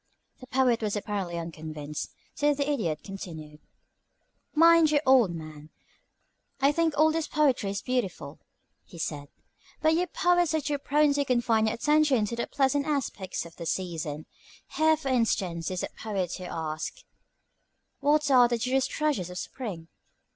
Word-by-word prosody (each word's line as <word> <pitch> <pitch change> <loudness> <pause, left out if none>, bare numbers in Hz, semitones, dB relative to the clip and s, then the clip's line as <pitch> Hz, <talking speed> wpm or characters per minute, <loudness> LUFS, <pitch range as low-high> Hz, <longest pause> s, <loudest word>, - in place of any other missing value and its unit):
The 255 - -12
Poet 250 -3 +2
was 210 -1 -1
apparently 200 -4 -3
unconvinced, 155 -3 -6 0.2
so 295 0 +2
the 280 0 -1
Idiot 175 - -1
continued: 160 -6 -8 1.0
"Mind 330 0 +6
you, 295 -1 +3
old 250 -10 +5
man, 155 -1 -9 0.9
I 275 +1 +4
think 325 0 0
all 310 +1 +5
this 325 0 -1
poetry 270 -9 +1
is 200 0 -4
beautiful," 195 - -3 0.4
he 170 - -14
said; 145 -3 -4 0.5
"but 315 +1 +3
you 355 +2 +1
poets 350 -1 +2
are - - +2
too 290 0 -2
prone 295 +1 +3
to 285 0 +1
confine 235 -4 +2
your 220 - 0
attention 295 -4 +3
to 235 - -4
the 235 - -3
pleasant 280 +1 +1
aspects 230 - -2
of 170 - -13
the 170 - -6
season. 160 -5 -3 0.5
Here, 315 0 +3
for 275 -3 -4
instance, 190 -9 0
is 185 -1 -3
a - - -3
poet 195 -5 -3
who 185 - -8
asks 160 -2 -5 1.0
'What 295 0 +2
are 250 -2 +7
the 240 0 0
dearest 255 +3 0
treasures 295 - -1
of 180 - -7
spring?' 190 -9 -6
235 Hz, 160 wpm, -27 LUFS, -, 1.0 s, are